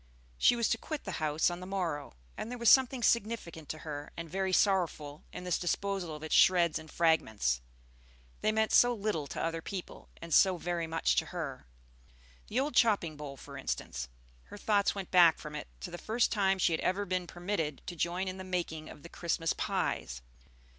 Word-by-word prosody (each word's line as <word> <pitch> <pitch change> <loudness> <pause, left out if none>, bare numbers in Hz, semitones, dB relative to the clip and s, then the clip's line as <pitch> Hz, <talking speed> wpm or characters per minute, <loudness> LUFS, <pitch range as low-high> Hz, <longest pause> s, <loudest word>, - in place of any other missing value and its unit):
She - - +5
was 235 -1 +1
to - - +1
quit 310 -2 -5
the 190 -5 -5
house 155 +2 +2
on 175 - -5
the 180 - -8
morrow; 170 - -3 0.2
and 220 - -5
there 245 - -5
was 235 -1 +5
something 260 -2 +4
significant 210 -10 0
to 155 - -4
her, 145 -1 -5
and 165 0 -5
very 190 +3 -1
sorrowful, 170 -7 +1
in - - -7
this 180 -1 0
disposal 185 -2 -2
of 150 - -10
its 155 - -3
shreds 175 -4 +5
and 155 0 -12
fragments; 110 - +1 0.8
they 215 - +2
meant 220 0 +1
so 245 0 +6
little 200 -9 -2
to - - -6
other 165 0 -2
people, 185 +1 -7
and 170 -1 -6
so 190 +2 +5
very 170 -1 -2
much 165 0 +1
to - - +2
her. 150 - -6 0.8
The 230 - 0
old 290 +3 -1
chopping 200 -9 +3
bowl, 145 -2 -8
for - - -10
instance, 65 0 -4 0.4
her - - -11
thoughts 205 -1 +2
went 195 -2 -6
back 175 -3 +7
from 150 -1 -8
it 150 - -6
to 180 - -6
the 175 - -6
first 225 +2 +1
time 195 -3 +2
she 175 -2 +2
had 160 - -1
ever 200 +2 0
been 180 -1 -2
permitted 175 -6 -3
to 175 - -6
join 175 +3 -1
in 185 0 -4
the - - -5
making 170 -4 -3
of 145 - -12
the - - -8
Christmas 165 -1 -1
pies. - - -2
175 Hz, 200 wpm, -31 LUFS, 155-200 Hz, 0.8 s, back